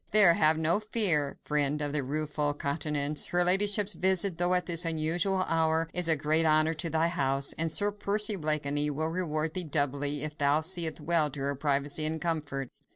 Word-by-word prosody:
There, 200 -5 +6
have 155 -1 +3
no 160 +5 0
fear, 190 -10 +2
friend 150 0 -1
of 145 -1 -3
the 150 - 0
rueful 150 +1 -3
countenance, 145 0 -1
her 175 0 +1
ladyship's 205 +2 +3
visit, 185 0 0
though 175 +1 +1
at 180 -1 -1
this 170 0 +2
unusual 170 +4 0
hour, 160 -1 0
is 180 -1 +1
a 160 - +4
great 155 +2 +1
honour 155 0 +2
to 165 +1 -3
thy 160 +1 0
house, 140 -5 -1
and 165 0 -1
Sir 205 +4 +1
Percy 210 +1 0
Blakeney 150 -3 -1
will 155 +2 -3
reward 160 -2 -3
thee 185 - -1
doubly, 145 -1 -1
if 155 -1 -3
thou 145 +2 +1
seest 165 -1 0
well 165 -3 +2
to 140 0 -7
her 140 +1 -2
privacy 145 +2 -1
and 160 +1 -3
comfort." 150 -6 -4
160 Hz, 190 wpm, -28 LUFS, 145-175 Hz, -, There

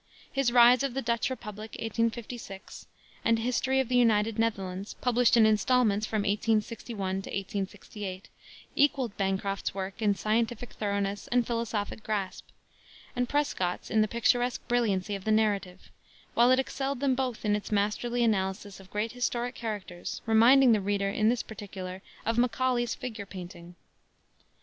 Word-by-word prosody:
His 270 -3 +1
Rise 245 0 +7
of 275 -3 -2
the 270 - -1
Dutch 235 +1 0
Republic, 215 -4 -7
1856, 230 -2 -4 0.4
and 230 0 +3
History 250 +3 +1
of 265 - +1
the 250 - 0
United 225 -2 +3
Netherlands, 195 -3 -2
published 245 -1 +3
in 225 - +7
installments 215 0 +3
from 215 -2 -1
1861 210 -2 -1
to - - -9
1868, 195 0 -5 0.5
equaled 270 -6 +2
Bancroft's 195 0 -1
work 195 +3 -5
in 205 -2 +3
scientific 225 +3 -1
thoroughness 200 -1 -2
and 245 -1 +2
philosophic 225 -3 -2
grasp, 205 -3 -3 0.7
and 245 -1 -1
Prescott's 235 -12 -1
in 220 - +4
the 215 - +3
picturesque 240 +2 +1
brilliancy 210 -5 +1
of 195 -1 -4
the 220 - 0
narrative, 205 -4 0 0.4
while 240 +1 +5
it 255 - +5
excelled 270 0 -2
them 275 -1 +2
both 255 -4 -2
in 210 0 +3
its 210 - -5
masterly 215 +4 0
analysis 195 -2 -1
of 190 -1 -15
great 210 +3 -2
historic 245 0 -2
characters, 205 -7 -5
reminding 240 +4 +6
the 215 -2 +3
reader, 200 0 0
in 215 +2 +2
this 240 0 0
particular, 190 -3 -8 0.2
of 230 +1 +1
Macaulay's 245 0 +1
figure 220 -5 -6
painting. 175 -2 -10
220 Hz, 150 wpm, -29 LUFS, 200-240 Hz, 0.7 s, Rise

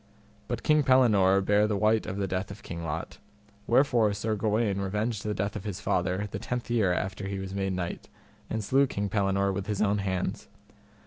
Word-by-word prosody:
But 120 -1 -3
King 150 0 +4
Pellinore 110 -8 +4
bare 105 +1 +4
the 105 -1 0
wite 110 +2 +2
of 95 - -4
the 100 - 0
death 95 +1 -2
of 100 +1 -10
King 85 0 -6
Lot, 80 0 -5 0.5
wherefore 120 -4 +3
Sir 110 +2 -1
Gawaine 105 -1 0
revenged 105 +3 -2
the 105 -1 -2
death 100 +1 -2
of - - -5
his 105 -4 -4
father 95 +3 0
the - - -4
tenth 120 -1 -4
year 110 -6 +3
after 95 +2 -2
he 100 0 -3
was 95 0 -5
made 95 -1 -1
knight, 90 -1 -4 0.4
and 110 -1 -2
slew 135 +6 +3
King 100 -4 -3
Pellinore 100 -1 +1
with 100 0 -4
his 105 -2 -2
own 105 -1 +2
hands. 95 -2 -2
100 Hz, 200 wpm, -28 LUFS, 95-110 Hz, 0.5 s, King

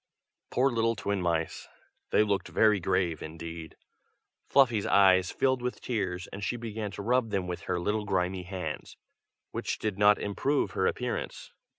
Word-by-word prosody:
Poor 135 +2 +2
little 115 -1 +1
twin 100 -1 -2
mice! 85 -2 -1 0.4
they - - +4
looked 100 -2 0
very 105 -2 +3
grave 90 -3 0
indeed. 80 0 -8 0.7
Fluffy's 120 -7 +4
eyes 95 -2 +5
filled 130 -2 +1
with 125 0 -3
tears, 95 -6 -2
and 100 +1 -6
she 120 +6 -1
began 110 -2 -4
to 100 +1 -7
rub 125 +1 +2
them 100 -3 -1
with 90 -1 -4
her 90 - +1
little 105 +4 -1
grimy 90 -1 0
hands, 90 0 -6 0.5
which - - -3
did 105 -2 -3
not 105 0 +6
improve 135 +8 0
her 95 - +1
appearance. 125 -1 -3
100 Hz, 160 wpm, -29 LUFS, 90-115 Hz, 0.7 s, not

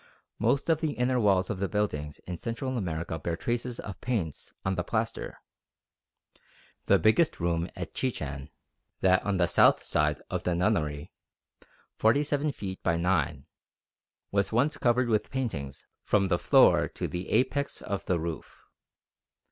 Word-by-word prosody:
Most 140 - +1
of 160 -2 +2
the 155 -3 0
inner 125 +1 +1
walls 100 -2 +3
of 100 - -4
the 100 - -1
buildings 75 -9 -2
in 90 - -4
Central 130 +3 -3
America 85 -6 -3
bear 85 +2 -2
traces 120 +5 -3
of 100 - -7
paints 105 - -3
on 95 - +1
the 90 -1 -1
plaster. 110 +4 -3 1.5
The - - +6
biggest 110 +10 +3
room 85 0 0
at 90 -3 -6
Chichen, 75 - -3 0.5
that 95 0 +4
on 100 -2 0
the 90 - +4
south 85 - +4
side 75 0 +1
of - - -3
the 90 - 0
Nunnery, 80 -6 0 0.9
47 145 +5 +2
feet 95 -7 -6
by 85 -1 +1
9, 85 -6 0 0.9
was 100 -1 +1
once 135 +7 +2
covered 125 0 +2
with 110 -2 +1
paintings 110 - -4 0.2
from 100 -3 +2
the 85 - +2
floor - - +5
to - - -4
the 90 +1 -5
apex 140 +2 +1
of 100 -1 -3
the 90 -2 +1
roof. 80 0 -6
95 Hz, 150 wpm, -28 LUFS, 85-120 Hz, 1.5 s, The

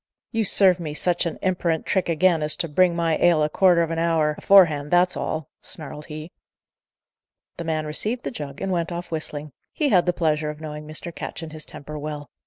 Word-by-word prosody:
"You 225 -2 0
serve 185 -2 +5
me 155 -3 -5
such 175 +1 +1
a 165 - -5
imperant 170 -3 0
trick 190 -3 0
again, 165 0 +3
as 150 0 +4
to 170 - -2
bring 175 +3 +3
my 165 -2 +1
ale 170 -3 +4
a 150 - +1
quarter 175 0 +4
of 165 - -3
a 165 - -2
hour 165 -2 +1
aforehand, 155 -8 +4
that's 180 +2 +3
all!" 155 -2 -3
snarled 150 -1 -7
he. 155 +1 -8 1.3
The 170 - -5
man 155 -1 -1
received 215 +11 -1
the - - -4
jug, 145 - -7
and 195 - -2
went 170 -1 -1
off 175 0 -6
whistling; 155 -2 -5 0.2
he 300 -3 0
had 180 -6 +3
the - - +4
pleasure 155 -3 0
of 150 0 -7
knowing 150 -1 -7
Mr. 155 +2 -3
Ketch 165 - -7
and 155 -1 -8
his 155 -1 -5
temper 150 +1 -8
well. 145 -1 -6
165 Hz, 210 wpm, -23 LUFS, 150-175 Hz, 1.3 s, serve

